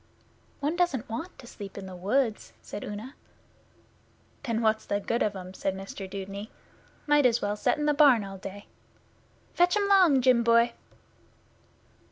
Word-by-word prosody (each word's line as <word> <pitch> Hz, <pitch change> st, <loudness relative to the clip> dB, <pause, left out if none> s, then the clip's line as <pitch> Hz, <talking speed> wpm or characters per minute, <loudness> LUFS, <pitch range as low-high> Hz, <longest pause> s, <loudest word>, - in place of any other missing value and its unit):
'One 295 Hz, +4 st, 0 dB
doesn't 345 Hz, -9 st, 0 dB
want 275 Hz, +11 st, -6 dB
to -, -, -13 dB
sleep 200 Hz, -4 st, -10 dB
in 195 Hz, -, -6 dB
the 185 Hz, -1 st, -8 dB
woods,' 215 Hz, +5 st, -1 dB
said -, -, -7 dB
Una. 215 Hz, +6 st, -7 dB, 1.3 s
'Then 230 Hz, -4 st, -2 dB
what's 220 Hz, 0 st, +2 dB
the 205 Hz, -, 0 dB
good 230 Hz, +3 st, -2 dB
of 210 Hz, -1 st, 0 dB
'em?' 185 Hz, -1 st, -8 dB
said 190 Hz, 0 st, -2 dB
Mr 195 Hz, 0 st, -7 dB
Dudeney. 200 Hz, +2 st, -6 dB, 0.6 s
'Might 295 Hz, -3 st, +5 dB
as 235 Hz, -1 st, +1 dB
well 205 Hz, 0 st, -1 dB
set 210 Hz, -, +1 dB
in 295 Hz, -, -1 dB
the 295 Hz, -, +3 dB
barn 280 Hz, -7 st, +5 dB
all 195 Hz, -1 st, -8 dB
day. 195 Hz, +2 st, -8 dB, 0.9 s
Fetch 355 Hz, +3 st, +3 dB
'em 405 Hz, -1 st, +1 dB
'long, 370 Hz, -9 st, +5 dB
Jim 250 Hz, -2 st, +4 dB
boy! 235 Hz, 0 st, +4 dB
230 Hz, 165 wpm, -27 LUFS, 200-280 Hz, 1.3 s, Might